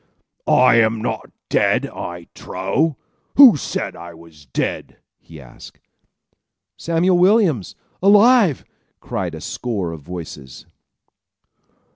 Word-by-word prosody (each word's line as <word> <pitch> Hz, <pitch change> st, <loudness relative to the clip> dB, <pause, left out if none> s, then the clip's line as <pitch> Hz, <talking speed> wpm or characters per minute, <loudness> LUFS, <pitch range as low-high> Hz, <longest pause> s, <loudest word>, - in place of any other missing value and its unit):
"I 125 Hz, -2 st, +4 dB
am 110 Hz, 0 st, +2 dB
not -, -, -4 dB, 0.2 s
dead, -, -, +1 dB
I 85 Hz, -1 st, -8 dB
trow! 130 Hz, -, -2 dB, 0.4 s
Who 265 Hz, -, +8 dB
said 145 Hz, -, -5 dB
I 85 Hz, 0 st, -11 dB
was 80 Hz, -3 st, -18 dB
dead?" -, -, -4 dB, 0.2 s
he 80 Hz, -2 st, -15 dB
asked. 65 Hz, -3 st, -15 dB, 1.0 s
"Samuel 175 Hz, +2 st, 0 dB
Williams! 180 Hz, -, +2 dB, 0.3 s
Alive!" 205 Hz, -, +4 dB, 0.3 s
cried -, -, -5 dB
a -, -, -10 dB
score 100 Hz, -9 st, -4 dB
of 80 Hz, -2 st, -9 dB
voices. 75 Hz, -6 st, -10 dB
115 Hz, 105 wpm, -19 LUFS, -, 1.0 s, Who